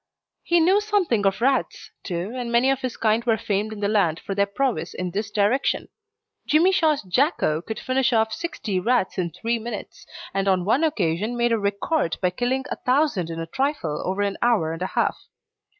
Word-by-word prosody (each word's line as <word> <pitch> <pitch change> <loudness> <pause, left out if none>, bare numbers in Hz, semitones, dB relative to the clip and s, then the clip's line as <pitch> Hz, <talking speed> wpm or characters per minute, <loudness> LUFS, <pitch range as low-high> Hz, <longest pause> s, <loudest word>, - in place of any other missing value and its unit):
He 345 0 +2
knew 375 +5 +4
something 370 - +1
of 195 +3 -1
rats, 265 +2 0
too, 180 +2 -4
and 245 -2 -4
many 240 +3 +4
of 270 -1 -1
his 255 -2 -4
kind 220 +1 +2
were 230 -2 +2
famed 210 0 -1
in 210 -1 -7
the 200 - +1
land 195 -7 +2
for 200 - -5
their 200 +1 +1
prowess 255 +5 -2
in 180 -1 -3
this 210 +4 -3
direction. 210 +5 +1 0.6
Jimmy 330 +5 +4
Shaw's 315 -7 +2
Jacko 185 - +1
could 220 +4 -6
finish 260 0 +1
off 220 -1 +2
sixty 275 - -3
rats 230 -1 +1
in 175 -2 0
three 230 +8 -2
minutes, 225 -2 -7 0.3
and 195 0 0
on 185 -2 +2
one 250 +9 +2
occasion 215 - 0
made 240 0 +2
a 230 - +2
record 200 - -1
by 180 -1 +1
killing 250 +6 -1
a - - -2
thousand 255 - +1
in 165 0 -5
a 165 - -3
trifle 175 - -2
over 190 +2 -1
an 200 -1 -2
hour 210 -10 +2
and 165 - -7
a 185 - 0
half. - - -1
220 Hz, 200 wpm, -23 LUFS, 195-265 Hz, 0.6 s, knew